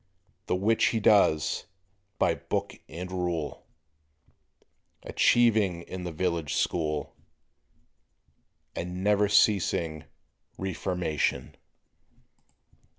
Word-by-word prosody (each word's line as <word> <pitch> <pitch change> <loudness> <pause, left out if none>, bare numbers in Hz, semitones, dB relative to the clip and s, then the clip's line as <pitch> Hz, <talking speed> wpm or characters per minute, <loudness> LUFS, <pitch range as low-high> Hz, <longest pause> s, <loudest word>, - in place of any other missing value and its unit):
The - - +1
which 110 +5 +2
he 115 - +1
does 80 -8 +3 0.5
"by - - +2
book - - -3 0.2
and 90 +3 -7
rule," 90 -5 -3 1.4
Achieving 105 -8 +3
in 90 0 -7
the 90 - -4
village 85 -2 -2
school 75 -3 -1 1.6
A - - -2
never 100 +3 +1
ceasing 85 -6 +2 0.5
reformation. 90 -4 -2
90 Hz, 80 wpm, -28 LUFS, 80-100 Hz, 1.6 s, does